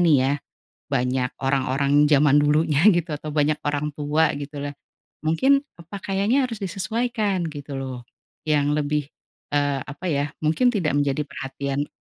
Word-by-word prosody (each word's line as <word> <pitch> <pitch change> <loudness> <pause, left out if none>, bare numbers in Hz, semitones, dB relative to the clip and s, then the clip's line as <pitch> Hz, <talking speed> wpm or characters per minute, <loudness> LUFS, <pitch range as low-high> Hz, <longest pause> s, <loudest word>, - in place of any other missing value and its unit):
nih 165 -5 +5
ya, 135 - +2 0.6
banyak 125 -1 0
orang-orang 140 +2 +2
zaman 145 -1 +5
dulunya 150 +2 +2
gitu 175 0 -1
atau 150 +1 -7
banyak 150 0 +2
orang 145 +1 0
tua 150 +2 +2
gitu 145 0 -7
loh, 145 - -9 0.5
mungkin 270 - +3
pakaiannya 200 - -1
harus 230 -4 -6
disesuaikan 205 0 -1
gitu 145 -1 -7
loh, 130 -2 -6 0.4
yang 145 -1 +2
lebih, 150 -1 -1 0.4
eee, 145 -1 +1
apa 145 +5 -9
ya 145 +1 0
mungkin 160 +12 +3
tidak 165 -9 0
menjadi 145 +1 +1
perhatian 140 +1 -4
150 Hz, 140 wpm, -23 LUFS, 140-170 Hz, 0.6 s, nih